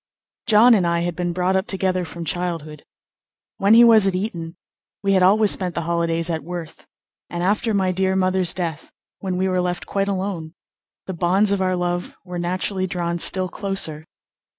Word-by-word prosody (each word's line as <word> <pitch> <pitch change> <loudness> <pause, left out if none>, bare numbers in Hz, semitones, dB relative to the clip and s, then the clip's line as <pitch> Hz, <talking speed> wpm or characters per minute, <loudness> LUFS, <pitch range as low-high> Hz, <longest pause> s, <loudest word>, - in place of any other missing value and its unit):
John 230 +3 +6
and 190 -6 +2
I 170 0 0
had 175 -1 -3
been 175 0 -2
brought 180 +2 0
up 190 +2 0
together 185 -2 -1
from 170 0 -8
childhood. 165 -3 -4 0.7
When 200 +3 +4
he 235 - +8
was 220 -4 +6
at 190 - 0
Eton 175 -4 -4 0.5
we 195 0 +2
had 190 - +3
always 205 +3 +4
spent 180 -3 -2
the 170 - -2
holidays 170 0 -1
at 160 -3 -3
Worth, 170 -1 -8 0.4
and 175 0 -4
after 210 +4 0
my 190 -3 +1
dear 190 +1 0
mother's 185 -2 +1
death, 165 -4 -5 0.3
when 185 -2 -3
we 190 +1 0
were 185 -1 0
left 180 0 -3
quite 195 0 -2
alone, 185 -4 -4 0.5
the 190 - -5
bonds 185 +4 +2
of 200 -1 0
our 185 -1 0
love 175 0 -3
were 180 -1 -6
naturally 185 +2 -2
drawn 175 -2 -3
still 185 +2 +6
closer. 175 -6 -3
180 Hz, 185 wpm, -21 LUFS, 170-195 Hz, 0.7 s, he